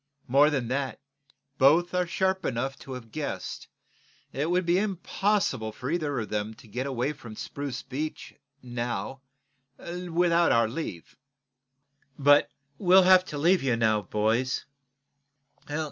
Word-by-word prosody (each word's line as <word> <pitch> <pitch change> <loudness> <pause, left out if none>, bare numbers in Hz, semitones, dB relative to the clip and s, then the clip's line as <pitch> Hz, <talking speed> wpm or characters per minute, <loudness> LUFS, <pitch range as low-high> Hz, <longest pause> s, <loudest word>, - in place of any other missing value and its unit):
More 140 +4 +5
than 135 -6 -1
that, 135 0 -2 0.6
both 160 +7 +5
are 180 -1 +1
sharp 190 +2 0
enough 135 +2 -2
to 135 - -8
have 115 -3 -9
guessed 150 +2 -5 0.6
that 135 - -4
it 155 - 0
would 180 +1 +1
be 175 +2 +3
impossible 195 - 0
for 125 +6 -5
either 150 -6 -1
of 110 - -4
them 105 +1 -3
to - - -17
get 125 +6 -4
away 130 +2 -1
from 115 -6 -11
Spruce 140 +1 -5
Beach, 145 +4 -5 0.3
now, 120 +2 -4 0.6
without 175 -1 +1
our 115 -1 +4
leave. 110 - -6 1.0
But 145 +1 +5 0.3
we'll 185 0 +6
have 185 0 +7
to 150 - -6
leave 175 +5 +3
you, 130 -3 +1
now, 110 -2 +2
boys. 110 +6 0
140 Hz, 140 wpm, -27 LUFS, 120-175 Hz, 1.0 s, have